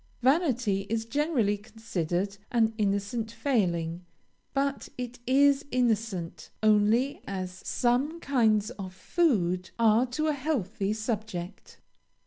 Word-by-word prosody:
Vanity 250 - +2
is 225 0 -1
generally 250 -5 +1
considered 200 -3 -3
an 225 -2 +3
innocent 205 +3 -1
failing; 175 - 0 0.5
but 275 0 -1
it 245 -1 -5
is 280 +2 +4
innocent 225 -9 -1
only 215 +5 +3
as 185 -1 -5
some 260 +7 +1
kinds 225 -7 +2
of 190 -5 -8
food 190 - +1
are 230 +2 +4
to 305 +6 -2
a 310 - +2
healthy 230 - -1
subject. 215 -5 -4
225 Hz, 110 wpm, -28 LUFS, 200-260 Hz, 0.5 s, is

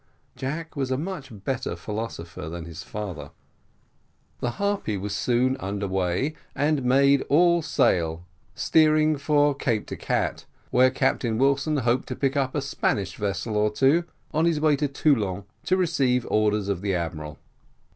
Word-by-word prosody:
Jack 155 +5 -5
was 135 -3 -1
a 130 - 0
much 165 -2 -5
better 130 0 -2
philosopher 105 -8 -6
than 85 0 -6
his 85 0 -8
father. 90 -9 -6 1.1
The 120 - -1
Harpy 200 - -1
was 100 +1 -4
soon 125 +4 +1
under 100 -3 -3
way, 95 - 0 0.2
and 145 -1 +1
made 140 +2 +4
all 170 +3 +4
sail, 85 - +1 0.3
steering 155 +1 +4
for 145 0 +3
Cape 120 -6 -1
de - - -6
Gatte, - - -2 0.3
where 130 +1 +5
Captain 130 -3 0
Wilson 140 +4 +2
hoped 125 0 +1
to - - -4
pick 135 0 0
up 135 -2 0
a 145 - 0
Spanish 100 -9 -1
vessel 105 +2 -2
or 105 0 +3
two, 135 +10 +3 0.3
on 160 +2 +2
his 165 -3 +2
way 155 -1 +4
to 145 +1 0
Toulon 110 - +1 0.2
to 185 - +2
receive 135 -8 +2
the - - -9
orders 105 -1 +1
of 100 -3 -1
the 100 -2 0
admiral. 80 -3 -4
130 Hz, 160 wpm, -25 LUFS, 100-145 Hz, 1.1 s, where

